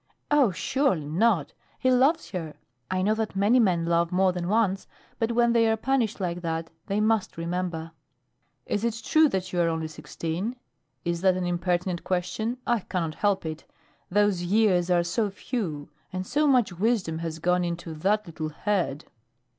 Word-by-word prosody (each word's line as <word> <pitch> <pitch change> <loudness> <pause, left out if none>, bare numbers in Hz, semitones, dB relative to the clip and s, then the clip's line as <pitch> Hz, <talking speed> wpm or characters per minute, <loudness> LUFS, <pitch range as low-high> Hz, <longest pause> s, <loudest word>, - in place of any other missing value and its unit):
"Oh, 290 -6 +5
surely 195 - 0
not! 175 +1 +1 0.2
He 255 - +2
loves 275 +6 +3
her. 165 -5 -5 0.3
I 185 0 0
know 210 +3 +3
that 220 -2 -3
many 205 +6 +4
men 180 -7 +2
love 170 0 +1
more 185 +1 +3
than 175 -1 -3
once, 200 -2 +1 0.3
but 230 +1 0
when 235 0 +3
they 230 -1 +4
are 220 0 +2
punished 240 -3 0
like 175 -2 -2
that, 165 -1 -3 0.2
they 200 +1 0
must 215 -4 +1
remember." 170 -1 -3 0.7
"Is 205 - -2
it 230 -1 -1
true 315 -1 +5
that 185 -3 -3
you 175 - +2
are 170 - +3
only 160 -1 -1
sixteen? 165 +7 -4 0.5
Is 170 0 -1
that 185 -1 +3
an 185 - -2
impertinent 175 0 -1
question? 185 +7 -2
I 240 -1 +2
cannot 170 -4 -3
help 200 0 0
it. 160 0 -5 0.5
Those 205 -2 +2
years 185 -1 +2
are 175 -1 +3
so 205 +5 0
few, 180 - -4 0.2
and 185 0 -4
so 300 +8 +1
much 250 -9 +3
wisdom 185 -4 0
has 165 -1 -4
gone 180 +2 +1
into 170 -1 -4
that 205 +7 +1
little 155 -2 -5
head." 165 -3 -1
185 Hz, 175 wpm, -26 LUFS, 170-220 Hz, 0.7 s, Oh